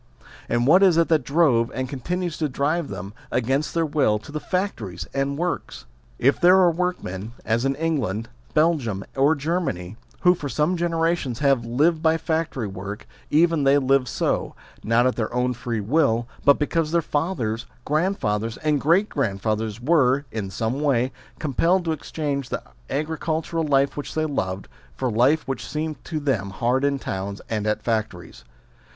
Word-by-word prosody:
and 120 0 +1
what 170 +8 +6
it 195 - +8
is 175 - +3
that 160 -3 +3
drove, 135 -6 +3
and 130 0 -2
continues 170 +6 -3
to 155 -2 -1
drive 145 +5 0
them, 95 +1 -7 0.2
against 135 +6 0
their 165 -1 +2
will, 145 -8 +2
to 110 - -11
the 155 - -3
factories 115 - -3
and 140 +1 -1
works? 170 - -3 0.3
If 135 +4 +2
there 180 +1 +7
are 180 -2 +5
workmen, 160 - -3
as 115 +3 +1
in 135 0 +1
England, 135 -9 -1 0.3
Belgium, 145 - +2
or 140 +4 +4
Germany, 140 - -2 0.2
who 180 0 +6
for 150 -5 -5
some 155 +6 +1
generations 165 -6 0
have 135 -4 +2
lived 155 +7 +2
by 160 0 +3
factory 160 -6 -2
work, 100 +1 -6 0.2
even 165 0 +3
they 140 +1 +5
live 135 -1 +2
so, - - -1 0.3
not 115 +2 +3
at 130 - +2
their 110 -2 -1
own 125 +1 0
free 120 -1 -3
will 120 -1 +2 0.2
but 140 0 +6
because 155 +1 0
their 170 -1 +2
fathers, 135 -9 -2 0.2
grandfathers, 115 - 0
and 150 -3 0
great 175 +8 +3
grandfathers 110 - -2
were, 140 -1 +3
in 105 -4 -4
some 110 +7 -2
way, 130 -3 +2 0.3
compelled 170 +6 +1
to 165 - 0
exchange 145 -3 -3
the - - -3 0.3
agricultural 160 +2 -2
life 140 -1 +2
which 145 - -6
they 155 0 +1
loved, 95 -10 -3 0.3
for 130 -2 -1
life 130 +8 +3
which 135 -3 -3
seemed 155 -2 -4
to 160 -2 -3
them 125 -10 -1
hard 120 +7 0
in 140 0 +2
towns 100 -4 -4
and 110 -1 -1
at 105 - 0
factories. 110 - -3
140 Hz, 170 wpm, -23 LUFS, 115-160 Hz, 0.3 s, it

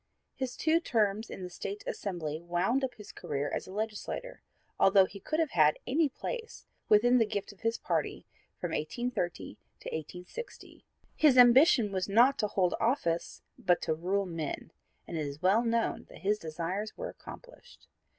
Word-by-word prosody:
His 260 -2 -4
two 320 +1 +3
terms 220 - 0
in 185 - -7
the 180 - -5
State 200 +3 -6
Assembly 160 -5 -4
wound 180 +10 0
up 260 - -2
his 210 -3 -11
career 145 0 -3
as - - -3
a - - -9
legislator, 220 - -4 0.4
although 195 0 +6
he 200 +1 -10
could 310 - -2
have 320 -3 +1
had 155 -2 +4
any 295 +3 +2
place 455 - -6 0.2
within 245 +4 +5
the 225 - +4
gift 205 -1 -3
of 195 - -24
his 225 0 0
party - - -2 0.3
from 175 - -3
1830 175 +2 -3 0.2
to - - -6
1860. 180 - -8 0.3
His 295 -5 +5
ambition 245 - +7
was 190 0 -2
not 240 +7 +5
to 210 - +2
hold 185 -3 +1
office 225 -9 -1 0.2
but 175 -1 +3
to 160 - +1
rule 190 +5 -1
men, 165 -5 -5 0.4
and 170 - -4
it 150 - -1
is 140 +1 -7
well 200 +6 +4
known 230 -1 0
that - - -13
his 210 +2 +1
desires 175 +6 -4
were - - -4
accomplished. - - -13
205 Hz, 170 wpm, -30 LUFS, 175-245 Hz, 0.4 s, ambition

